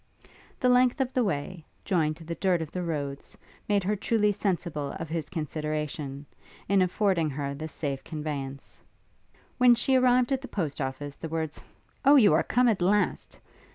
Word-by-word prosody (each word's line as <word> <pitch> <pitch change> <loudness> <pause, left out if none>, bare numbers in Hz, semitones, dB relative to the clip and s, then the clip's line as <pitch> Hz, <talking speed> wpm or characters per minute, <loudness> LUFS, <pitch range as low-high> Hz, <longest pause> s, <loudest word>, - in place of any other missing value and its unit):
The 255 - +2
length 250 +2 +4
of 260 -1 -1
the 250 - +2
way, 170 -2 -3 0.2
joined 155 -4 +1
to 165 - -12
the 165 +1 -5
dirt 180 0 +1
of 160 -2 -5
the 180 - -3
roads, 145 -5 -4 0.3
made 200 -2 +2
her 205 +3 0
truly 210 +1 +1
sensible 175 -7 -2
of 165 - -6
his 160 -1 -3
consideration, 150 -3 -4 0.4
in 195 0 +3
affording 185 -3 +1
her 140 0 -3
this 155 +2 -6
safe 140 -3 -4
conveyance. 145 -3 -6 0.8
When 250 -1 +7
she 260 +3 +2
arrived 255 0 +4
at 265 -1 +1
the 265 - -7
Post 155 -8 -3
office, 140 +2 -4
the 160 - -6
words, 160 -1 -4 0.4
'Oh, 285 +1 +7
you 215 - +6
are 155 - +4
come 250 +1 +2
at 215 -6 +2
last!' 205 +4 +1
170 Hz, 175 wpm, -27 LUFS, 150-210 Hz, 0.8 s, When